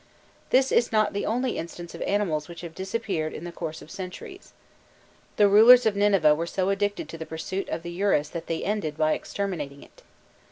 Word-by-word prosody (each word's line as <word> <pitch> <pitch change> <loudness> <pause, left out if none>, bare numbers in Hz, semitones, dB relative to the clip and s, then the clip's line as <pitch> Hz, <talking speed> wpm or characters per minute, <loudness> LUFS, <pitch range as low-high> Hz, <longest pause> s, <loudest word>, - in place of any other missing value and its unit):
This 265 +1 +3
is 235 - +2
not 215 -1 +2
the 200 - -2
only 245 +3 -1
instance 170 +1 -8
of - - -9
animals 175 -8 0
which 170 -1 -10
have 170 -2 -8
disappeared 190 -4 -3
in - - -7
the 175 - -6
course 160 -2 -6
of 155 - -14
centuries; 205 - -9 0.8
the 205 - +5
rulers 230 +5 +8
of 215 -2 +2
Nineveh 195 -7 +4
were 165 +3 -2
so 185 +2 -1
addicted 205 +1 -1
to 165 - -8
the 160 - -5
pursuit 160 +5 -4
of 165 - -4
the 170 - -6
urus 175 -5 +1
that 170 -1 -7
they 165 - -2
ended 180 -8 -2
by 155 0 +2
exterminating 155 -9 -4
it. - - -19
185 Hz, 200 wpm, -26 LUFS, 160-205 Hz, 0.8 s, rulers